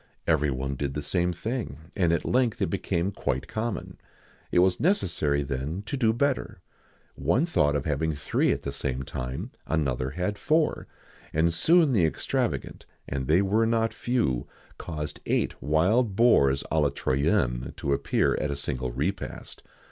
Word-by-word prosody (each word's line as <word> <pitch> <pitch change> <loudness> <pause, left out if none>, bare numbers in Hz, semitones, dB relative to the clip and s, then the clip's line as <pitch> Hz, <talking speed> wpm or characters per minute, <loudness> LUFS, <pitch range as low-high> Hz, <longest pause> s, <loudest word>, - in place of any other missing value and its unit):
Every 75 -2 +2
one 65 +1 -2
did 70 +1 -3
the 75 - -3
same 90 -1 +1
thing, 110 - -4 0.2
and 85 -3 +2
at 85 - 0
length 125 -3 +1
it - - 0
became 85 +4 -1
quite 65 -8 -2
common. 110 -1 -4 0.5
It - - +1
was 90 0 +4
necessary 85 - +1
then 70 +7 -3
to 140 - -3
do 115 -5 +3
better. 135 +3 -1 0.5
One 85 - +1
thought 75 - +2
of 70 - -1
having 80 +1 0
three 70 0 +1
at - - -2
the 70 - -3
same 65 -2 -2
time; 65 0 -5 0.2
another 65 -5 0
had 90 +7 -3
four; 155 0 +1 0.5
and 80 +2 +2
soon 160 - +4
the 100 -7 +3
extravagant - - -2 0.2
and 65 -2 -3
they 85 +6 +4
were 110 +4 +2
not 115 0 +1
few 115 - 0 0.3
caused 75 -3 -5
eight - - +1
wild 95 - +2
boars 70 - +4
à 80 - +3
la 75 - +3
Troyenne 65 -3 0
to 70 - 0
appear - - +1
at 75 - -1
a 70 - -2
single 65 -3 -2
repast. 75 +11 -4
80 Hz, 165 wpm, -27 LUFS, 70-110 Hz, 0.5 s, was